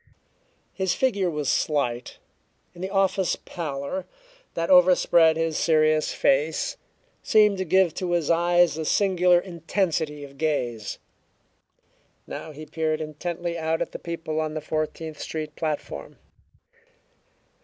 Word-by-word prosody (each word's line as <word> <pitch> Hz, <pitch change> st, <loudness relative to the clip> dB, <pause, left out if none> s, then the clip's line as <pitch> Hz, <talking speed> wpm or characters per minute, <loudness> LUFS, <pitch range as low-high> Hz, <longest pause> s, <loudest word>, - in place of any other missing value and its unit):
His 190 Hz, -1 st, 0 dB
figure 200 Hz, -8 st, +1 dB
was 150 Hz, -3 st, -3 dB
slight, 130 Hz, -5 st, 0 dB, 0.6 s
and 175 Hz, 0 st, -9 dB
the 190 Hz, -, -2 dB
office 195 Hz, -1 st, +1 dB
pallor 155 Hz, -, -5 dB, 0.5 s
that 165 Hz, +2 st, -1 dB
overspread 175 Hz, -3 st, +5 dB
his 165 Hz, -1 st, 0 dB
serious 155 Hz, -1 st, +3 dB
face 150 Hz, +4 st, +1 dB, 0.5 s
seemed 210 Hz, -2 st, +4 dB
to 190 Hz, -, -1 dB
give 185 Hz, -1 st, +3 dB
to 180 Hz, -2 st, -2 dB
his 170 Hz, -2 st, +1 dB
eyes 175 Hz, -1 st, +3 dB
a 160 Hz, -, -2 dB
singular 180 Hz, -1 st, +3 dB
intensity 165 Hz, -4 st, -2 dB
of 140 Hz, -1 st, -12 dB
gaze. 120 Hz, -9 st, -2 dB, 1.3 s
Now 160 Hz, -, -7 dB
he 155 Hz, +1 st, -9 dB
peered 155 Hz, 0 st, -1 dB
intently 170 Hz, +2 st, -4 dB
out 160 Hz, 0 st, 0 dB
at 170 Hz, -, -3 dB
the -, -, -7 dB
people 165 Hz, -2 st, -4 dB
on 155 Hz, 0 st, -3 dB
the -, -, -1 dB
Fourteenth 155 Hz, 0 st, -4 dB
Street 155 Hz, -1 st, -5 dB
platform. 155 Hz, -2 st, -4 dB
160 Hz, 125 wpm, -25 LUFS, 155-175 Hz, 1.3 s, overspread